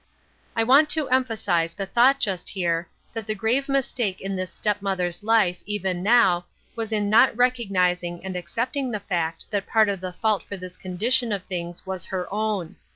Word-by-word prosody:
I 225 - +3
want 275 +6 +5
to 305 -3 0
emphasize 205 -10 +1
the 195 - -3
thought 250 +7 +4
just 195 -8 -1
here, 170 -3 -1 0.2
that 225 -2 -5
the 215 - -1
grave 240 +7 0
mistake 245 -7 0
in 195 0 -4
this 185 -1 -4
step 210 -1 -1
mother's 180 -3 -1
life, 215 -5 +3
even 190 -4 -2
now, 190 -5 +4 0.3
was 225 -1 -3
in 210 -2 +1
not 220 +3 +5
recognizing 185 -8 +1
and 190 -1 -4
accepting 235 - -2
the 215 -3 -2
fact 165 -4 -3
that 205 -2 -1
part 220 -2 +3
of 195 -2 -2
the 185 -1 -5
fault 215 +1 +1
for 200 - -7
this 185 0 -9
condition 225 +6 +1
of 200 -3 -2
things 175 -1 -6
was 190 -2 -4
her 185 -2 -3
own. 210 -5 -2
200 Hz, 185 wpm, -24 LUFS, 180-230 Hz, 0.3 s, want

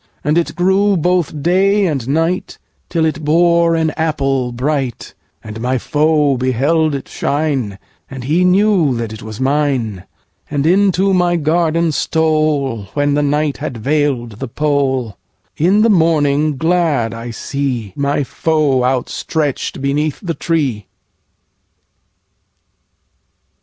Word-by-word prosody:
And 150 +2 +1
it 170 -1 0
grew 190 +2 +2
both 170 -3 0
day 195 +3 +3
and 140 -9 -2
night, 165 +6 -1 0.3
Till 165 -2 +1
it 155 0 -2
bore 170 +2 +3
an 160 -1 +1
apple 135 -6 -1
bright; 130 0 -3 0.3
And 110 +1 -8
my 130 +2 0
foe 150 +1 +1
beheld 140 +5 +1
it 135 - -6
shine, 140 -9 -2 0.3
And 130 -2 -7
he 160 +8 +1
knew 180 -6 +3
that 115 -2 -4
it 110 - -9
was 110 -1 -8
mine, 130 -8 -1 0.4
And 145 -1 -1
into 195 +2 +3
my 175 -1 +2
garden 165 +1 +1
stoleWhen 145 -5 0
the 145 - +1
night 145 0 0
had 140 -5 -5
veil'd 125 -4 -1
the 135 - -4
pole:In 140 - -1
the 230 - +4
morning 155 -4 +2
glad 160 -8 +1
I 115 +1 -7
seeMy 140 +2 -2
foe 145 -1 +1
outstretch'd 135 +3 -2
beneath 145 +2 -1
the 175 -4 -3
tree. 140 - -2
150 Hz, 120 wpm, -16 LUFS, 130-165 Hz, 0.4 s, the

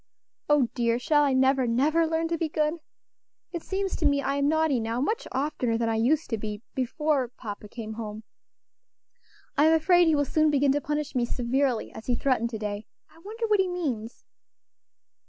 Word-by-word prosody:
Oh! 285 -5 +4
dear, 235 -1 +1
shall 295 +4 +2
I 280 -2 +2
never, 260 0 +3
never 300 +8 +2
learn 325 +1 0
to 335 - 0
be 325 - -1
good? 305 +2 0 0.7
It 340 - -4
seems 385 +1 -2
to 325 - -2
me 285 -1 +2
I 280 0 -1
am 280 0 +2
naughty 315 -4 +2
now 225 +1 -2
much 435 - -1
oftener 260 -4 -1
than 230 0 0
I 225 - 0
used 275 +8 +2
to 225 - -1
be 210 +1 -5
before 270 +1 0
papa 210 -2 -7
came 220 -1 -7
home. 215 -1 -6 1.4
I'm 315 +2 +6
afraid 350 +2 +4
he 320 - +4
will 285 0 +2
soon 310 +3 +2
begin 285 -1 +3
to 290 +1 0
punish 295 0 -3
me 250 -3 +1
severely, 250 0 -1
as 220 - -10
he 245 - +2
threatened 245 -2 +1
to 225 - -5
day. 210 0 -5 0.2
I 325 - -19
wonder 440 +6 -5
what 425 -2 +2
he 380 - +3
means?" 265 -11 -4
275 Hz, 190 wpm, -27 LUFS, 235-315 Hz, 1.4 s, I'm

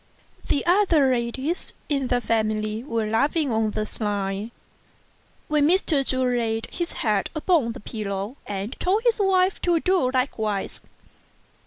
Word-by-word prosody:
The 285 - 0
other 340 -7 +4
ladies 260 +8 -2 0.2
of 275 -3 0
the 245 - +2
family 215 -1 -1
were 230 -5 -1
laughing 280 +6 +1
on 220 -1 +1
the 215 0 -2
sly, 205 -1 -3 1.0
when 300 -1 +3
Mr. 330 -5 +3
Chu 260 -1 0
laid 230 -3 0
his 345 -1 -3
head 210 -3 +1
upon 310 -7 +2
the 255 - -9
pillow, 205 +2 -4
and 205 +5 -4
told 400 +5 +1
his 475 -2 +2
wife 380 -1 +2
to 345 -2 +2
do 365 -7 +2
likewise. 220 -6 -1
250 Hz, 140 wpm, -24 LUFS, 215-315 Hz, 1.0 s, other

